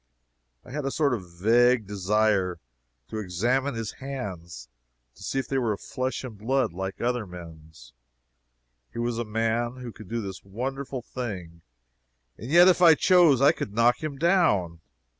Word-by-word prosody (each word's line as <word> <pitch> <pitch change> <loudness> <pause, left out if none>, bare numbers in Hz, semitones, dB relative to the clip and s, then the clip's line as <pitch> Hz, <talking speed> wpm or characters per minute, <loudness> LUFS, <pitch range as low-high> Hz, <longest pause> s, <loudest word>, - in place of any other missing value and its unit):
I 125 - -12
had 145 +2 -3
a 135 - -1
sort 140 -1 +1
of 95 -7 -5
vague 115 +6 +3
desire 100 -1 +1 0.5
to 110 - -4
examine 120 +8 -1
his 115 -2 -4
hands 95 - -7 0.5
and - - -15
see - - -3
if 135 - -1
they 135 - 0
were 115 -4 0
of 100 - -7
flesh 130 +1 -4
and 125 -4 -7
blood, 125 -1 0
like 95 +2 -5
other 120 -3 -1
men's. 80 -7 -12 1.0
Here 120 - -4
was 120 -1 -2
a - - 0
man 115 +2 -1
who 125 -2 -8
could 110 -3 -13
do 115 +1 -2
this 95 -3 -7
wonderful 130 +5 -5
thing, 95 -11 -7 0.7
and 115 - -9
yet 175 +4 +7
if 180 -1 +4
I 165 -3 +8
chose 170 -7 +5
I 140 - +7
could 100 - -6
knock 120 +1 +3
him 155 -3 -4
down. 135 - +2
115 Hz, 170 wpm, -26 LUFS, 95-135 Hz, 1.0 s, I